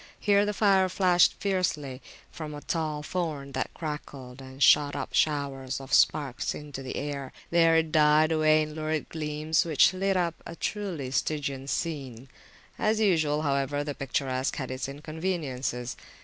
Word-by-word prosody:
Here 205 0 +3
the - - +1
fire 195 -3 +3
flashed 180 -1 +4
fiercely 155 -9 -1 0.3
from 155 -2 -7
a 145 - -8
tall 155 -3 -2
thorn, 155 -6 -3
that 130 0 -2
crackled 140 -5 -7
and 130 +1 -4
shot 145 -1 +5
up - - -5
showers 140 -4 0
of 135 0 -8
sparks 140 -4 +2
into 145 -2 -8
the 130 - -6
air; 140 -2 -4 0.2
there 165 -1 +5
it 160 -1 +1
died 155 0 +4
away 155 -1 +4
in 155 0 -6
lurid 155 0 -3
gleams, 155 0 0
which 165 +2 +4
lit 195 +1 0
up 170 -2 +1
a 170 - -8
truly 175 -11 -3
Stygian 140 -2 -2
scene. 135 -6 -4 0.5
As 215 0 +1
usual, 155 -7 +2
however, 140 0 0
the 145 0 -4
picturesque 130 -1 -2
had 130 -2 -4
its 130 +1 -4
inconveniences. 145 -5 -3
150 Hz, 155 wpm, -28 LUFS, 135-165 Hz, 0.5 s, shot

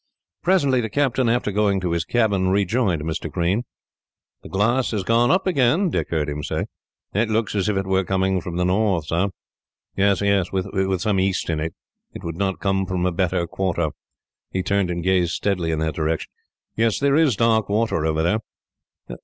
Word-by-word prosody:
Presently 145 -9 +3
the 110 - -3
captain, 130 -2 +1
after 115 -3 +1
going 100 -1 +2
to 90 -2 -2
his 85 -1 -1
cabin, 100 -5 +1
rejoined 100 -3 +1
Mr. 80 +1 -3
Green. 95 +7 0 0.8
"The - - -11
glass 120 +6 +1
has 105 -4 -2
gone 115 +4 +3
up 190 +2 +2
again," 165 +2 +2
Dick - - -1
heard 80 -3 -1
him 75 0 -4
say. - - -2 0.5
"That 110 +3 +1
looks 110 0 0
as 105 0 0
if 105 - 0
it 95 - -1
were 95 0 +1
coming 95 0 0
from 85 0 -6
the 90 0 +1
north, 95 -3 +1
sir." 85 +5 0 0.7
"Yes, 100 0 +3 0.3
with 95 -1 -1
some 105 -3 +1
east 95 -2 0
in 80 - -1
it. 80 +1 -4 0.4
It - - -8
could 85 - -4
not 95 +1 -1
come 95 -1 0
from 90 -1 -1
a 90 - +2
better 90 0 0
quarter." 85 -2 -1 0.6
He 95 - -2
turned 100 -1 +1
and 85 -1 -3
gazed 90 -2 +2
steadily 90 -5 -1
in 80 - 0
that 80 -1 -1
direction. 80 +1 -2 0.4
"Yes, 115 -1 +2
there 140 0 +2
is 155 -7 +4
dark 110 -1 +2
water 105 -6 +1
over 80 0 0
there." 90 +6 +2
95 Hz, 190 wpm, -22 LUFS, 90-110 Hz, 0.8 s, is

